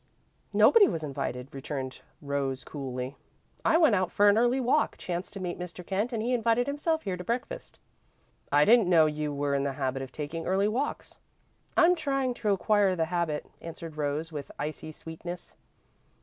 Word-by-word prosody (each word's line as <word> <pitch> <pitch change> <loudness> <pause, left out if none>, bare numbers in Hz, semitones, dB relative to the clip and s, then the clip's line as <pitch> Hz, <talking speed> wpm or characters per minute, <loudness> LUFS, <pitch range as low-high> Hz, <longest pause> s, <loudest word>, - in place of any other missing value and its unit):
"Nobody 440 -4 +7
was 160 - -3
invited," 135 -2 -4
returned 135 -1 -5 0.2
Rose, 140 -2 -2
coolly. 130 -2 -5 0.5
"I - - +4
went 315 -8 +5
out 185 -3 +1
for 205 - +4
an 205 - +5
early 245 +3 +3
walk, 260 +4 +2
chanced 175 +1 -4
to 200 - -6
meet 180 -2 -4
Mr. 180 0 -7
Kent, 205 +7 -1
and 225 -2 -2
he 245 +2 0
invited 235 0 +2
himself 315 +3 -1
here 190 - -2
to 180 - -7
breakfast." 250 - -4 0.7
"I 145 +1 +5
didn't 225 -4 +5
know 165 -3 +6
you 150 -1 -1
were 145 0 -1
in 140 - +2
the 140 0 -1
habit 135 -1 -2
of 135 -1 -7
taking 155 +3 -5
early 195 +2 +2
walks." 255 +7 -3 0.6
"I'm 355 0 +7
trying 275 -6 0
to 220 -3 -2
acquire 200 -1 +3
the 165 -2 +1
habit," 165 -4 -1 0.2
answered 165 -1 -8
Rose, 150 +2 -2
with 145 -2 -6
icy 155 +1 -5
sweetness. 165 +3 -8
175 Hz, 175 wpm, -28 LUFS, 145-230 Hz, 0.7 s, Nobody